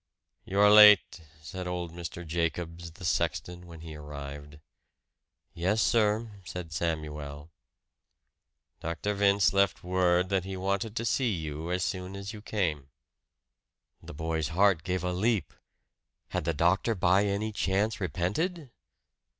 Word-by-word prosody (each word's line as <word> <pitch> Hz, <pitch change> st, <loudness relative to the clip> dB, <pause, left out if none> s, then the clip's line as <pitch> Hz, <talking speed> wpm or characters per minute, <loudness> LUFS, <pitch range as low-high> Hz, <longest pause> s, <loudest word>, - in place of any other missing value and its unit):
"You 95 Hz, +1 st, -2 dB
are 105 Hz, 0 st, +7 dB
late," 105 Hz, -5 st, +8 dB, 0.2 s
said 90 Hz, +4 st, -6 dB
old 90 Hz, -2 st, -4 dB
Mr. 85 Hz, 0 st, -7 dB
Jacobs, 85 Hz, +1 st, -3 dB
the 90 Hz, +3 st, -10 dB
sexton, 85 Hz, +1 st, -1 dB
when 85 Hz, -2 st, -11 dB
he 80 Hz, -1 st, -8 dB
arrived. 75 Hz, 0 st, -8 dB, 1.0 s
"Yes, 95 Hz, +6 st, 0 dB
sir," 110 Hz, -1 st, +1 dB
said 85 Hz, -3 st, -7 dB
Samuel. 75 Hz, -2 st, -4 dB, 1.3 s
"Dr. 85 Hz, +5 st, -3 dB
Vince 100 Hz, 0 st, +3 dB
left 100 Hz, 0 st, +2 dB
word 90 Hz, 0 st, +2 dB
that 95 Hz, -2 st, +1 dB
he 95 Hz, 0 st, -5 dB
wanted 100 Hz, +4 st, -2 dB
to 115 Hz, -, -2 dB
see 125 Hz, +2 st, +1 dB
you 80 Hz, -2 st, -4 dB
as 90 Hz, +1 st, 0 dB
soon 95 Hz, 0 st, -4 dB
as 100 Hz, +2 st, -6 dB
you 105 Hz, -, -9 dB
came." 80 Hz, -11 st, -2 dB, 1.1 s
The -, -, -10 dB
boy's 80 Hz, -1 st, -2 dB
heart 90 Hz, +1 st, +3 dB
gave 90 Hz, +1 st, -2 dB
a 90 Hz, 0 st, -1 dB
leap. 100 Hz, -, 0 dB, 0.8 s
Had -, -, -3 dB
the 85 Hz, -, +1 dB
doctor 95 Hz, +8 st, +2 dB
by 95 Hz, +2 st, +3 dB
any 105 Hz, +2 st, -1 dB
chance 100 Hz, +1 st, 0 dB
repented? 125 Hz, -, -2 dB
90 Hz, 135 wpm, -29 LUFS, 80-100 Hz, 1.3 s, late